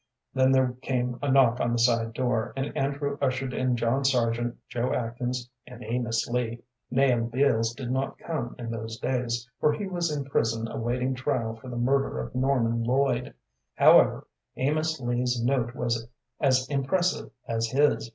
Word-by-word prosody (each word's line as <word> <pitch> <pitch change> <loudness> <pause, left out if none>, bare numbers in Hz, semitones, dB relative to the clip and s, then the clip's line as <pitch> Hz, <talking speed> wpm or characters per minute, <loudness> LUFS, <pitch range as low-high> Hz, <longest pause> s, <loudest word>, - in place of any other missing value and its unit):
Then 130 0 +4
there 130 -2 +3
came 125 -2 -1
a 145 -1 0
knock 125 -3 +5
on 120 - +1
the - - +1
side 115 -1 +2
door, 120 -2 -1
and 135 +1 -3
Andrew 140 +1 -1
ushered 130 -1 0
in 130 0 +1
John 120 +4 +1
Sargent, 120 -2 +1
Joe 120 +1 -2
Atkins, 125 +1 -2 0.2
and 125 -1 -10
Amos 115 0 -1
Lee. 120 -1 -2 0.3
Nahum 125 -3 +2
Beals 115 -3 +2
did 125 -2 -5
not 135 +1 -1
come 135 -8 -4
in 115 -2 -5
those 115 0 -5
days, 120 -1 -2
for 150 - +4
he 205 - -3
was 175 -3 -1
in 145 -2 -2
prison 115 -4 0
awaiting 125 +3 -1
trial 125 -3 -1
for 120 +3 -11
the 120 - -5
murder 130 - +1
of 65 - -5
Norman 125 -3 +1
Lloyd. 125 0 +1 0.4
However, - - +6 0.3
Amos 155 +3 0
Lee's 120 0 0
note 125 -2 0
was 115 -2 -1 0.3
as 130 -2 +3
impressive 150 +7 0 0.2
as 115 0 0
his. 135 -3 +2
125 Hz, 165 wpm, -27 LUFS, 115-135 Hz, 0.4 s, However